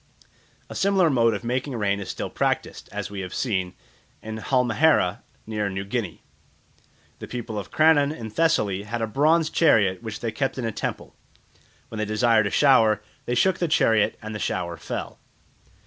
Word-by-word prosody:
A -, -, -9 dB
similar 190 Hz, -4 st, +2 dB
mode 115 Hz, -4 st, +3 dB
of 100 Hz, -, -6 dB
making 125 Hz, +3 st, -2 dB
rain 100 Hz, -3 st, 0 dB
is 100 Hz, -, -7 dB
still -, -, -4 dB
practised, -, -, -2 dB
as 100 Hz, -1 st, -5 dB
we 100 Hz, -, -5 dB
have 95 Hz, -1 st, -6 dB
seen, 95 Hz, -7 st, -1 dB, 0.5 s
in 110 Hz, 0 st, -6 dB
Halmahera 125 Hz, -, +2 dB, 0.2 s
near 105 Hz, -2 st, -2 dB
New 95 Hz, 0 st, -4 dB
Guinea. 100 Hz, -4 st, -4 dB, 1.0 s
The -, -, -8 dB
people 115 Hz, -3 st, -5 dB
of 100 Hz, -, -8 dB
Crannon 155 Hz, -2 st, +4 dB
in 115 Hz, -8 st, -7 dB
Thessaly 105 Hz, -, +1 dB
had 115 Hz, +3 st, -4 dB
a -, -, +2 dB
bronze 155 Hz, +8 st, +2 dB
chariot 105 Hz, -, +3 dB
which 110 Hz, -2 st, -6 dB
they 115 Hz, -, -2 dB
kept 135 Hz, +1 st, -2 dB
in 125 Hz, -, -3 dB
a 115 Hz, -, -1 dB
temple. -, -, -5 dB, 0.7 s
When 110 Hz, -, -6 dB
they 110 Hz, -, 0 dB
desired 110 Hz, 0 st, +2 dB
a -, -, -1 dB
shower 110 Hz, -5 st, +4 dB, 0.2 s
they 120 Hz, -, -1 dB
shook 185 Hz, +8 st, +2 dB
the 175 Hz, -, +1 dB
chariot 110 Hz, -8 st, +2 dB
and 110 Hz, 0 st, -6 dB
the 105 Hz, -, -5 dB
shower 85 Hz, -3 st, -2 dB
fell. 80 Hz, -, -6 dB
115 Hz, 180 wpm, -24 LUFS, 105-135 Hz, 1.0 s, Crannon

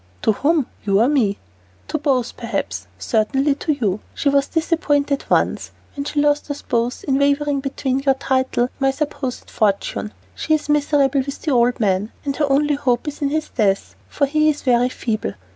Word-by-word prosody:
"To -, -, +4 dB
whom, 290 Hz, +6 st, +1 dB, 0.2 s
you 200 Hz, -1 st, +2 dB
or 230 Hz, -, +4 dB
me?" 240 Hz, -9 st, +2 dB, 0.5 s
"To 310 Hz, -, -1 dB
both, 265 Hz, -5 st, 0 dB
perhaps, 100 Hz, -, -4 dB
certainly 245 Hz, -, +1 dB
to 305 Hz, +2 st, -1 dB
you. 215 Hz, -8 st, -1 dB, 0.2 s
She 285 Hz, -, +1 dB
was 280 Hz, 0 st, +2 dB
disappointed 300 Hz, -4 st, 0 dB
once -, -, +1 dB, 0.3 s
when 280 Hz, -1 st, -4 dB
she 295 Hz, -, -1 dB
lost 295 Hz, +1 st, +2 dB
us 285 Hz, -, -5 dB
both 240 Hz, 0 st, -1 dB
by 270 Hz, -, +2 dB
wavering 280 Hz, +1 st, +2 dB
between 270 Hz, -1 st, -2 dB
your 275 Hz, -1 st, +2 dB
title 260 Hz, -2 st, 0 dB
and 245 Hz, -, -2 dB
my 270 Hz, -1 st, +3 dB
supposed 270 Hz, -2 st, -4 dB
fortune. 210 Hz, 0 st, 0 dB, 0.2 s
She 315 Hz, -, +1 dB
is 300 Hz, -1 st, -5 dB
miserable 285 Hz, -2 st, +2 dB
with 275 Hz, +1 st, -7 dB
the 310 Hz, -, 0 dB
old 245 Hz, 0 st, +3 dB
man, 200 Hz, 0 st, +1 dB
and 280 Hz, -1 st, -1 dB
her 295 Hz, -2 st, +1 dB
only 295 Hz, +2 st, +3 dB
hope 255 Hz, -2 st, 0 dB
is 295 Hz, 0 st, -5 dB
in 285 Hz, -, +1 dB
his 310 Hz, +1 st, -2 dB
death, 200 Hz, -4 st, 0 dB, 0.2 s
for 285 Hz, -, +1 dB
he 305 Hz, +2 st, +2 dB
is 295 Hz, -1 st, -2 dB
very 245 Hz, -1 st, +3 dB
feeble. 215 Hz, -, -3 dB
275 Hz, 190 wpm, -20 LUFS, 240-290 Hz, 0.5 s, To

